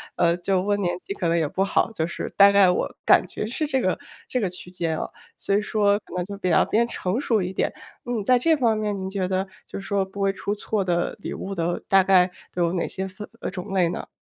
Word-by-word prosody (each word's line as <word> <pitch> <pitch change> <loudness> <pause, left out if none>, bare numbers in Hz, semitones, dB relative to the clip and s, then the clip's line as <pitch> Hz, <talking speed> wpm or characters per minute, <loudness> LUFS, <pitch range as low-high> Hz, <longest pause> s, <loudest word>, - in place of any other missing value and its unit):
呃， 170 -1 +3
就 185 +1 +1
问 205 +1 0
年 175 -2 0
纪 - - -5
可 185 -3 -2
能 165 0 +2
也 160 -2 +1
不 190 +6 0
好， 195 - +1
就 160 -7 -1
是 170 - -5
大 200 0 +8
概 200 -2 +6
我 180 - 0
感 - - +6
觉 - - -4
是 260 +7 -2
这 265 -3 0
个 185 -5 +1 0.3
这 255 - -1
个 195 - 0
区 180 0 -8
间 170 -3 -2
啊， - - -3 0.3
所 200 - 0
以 205 - +3
说 205 -1 +2
可 - - -15
能 180 - 0
就 200 +1 -7
比 185 -2 -1
较 165 - +4
偏 230 +2 +2
成 185 -2 -2
熟 230 -7 +1
一 180 +1 -3
点。 - - 0 0.3
嗯， 240 -3 -1
在 250 +2 +5
这 320 +7 +3
方 230 -5 +2
面 210 -2 -2
您 190 0 -4
觉 190 -1 -1
得 190 +1 0 0.2
就 - - -7
说 195 0 0
不 195 +1 -8
会 195 0 +3
出 195 +1 -3
错 210 0 -1
的 175 -2 0
礼 - - -4
物 195 +1 -5
的 170 0 -1
大 195 -1 +5
概 185 -1 +5 0.3
有 175 -1 +1
哪 175 - 0
些 190 0 -4
分 190 +2 -9
呃， - - -3
种 195 +1 -6
类 185 -3 +3
呢？ - - -5
195 Hz, 280 characters per minute, -24 LUFS, 180-205 Hz, 0.3 s, 大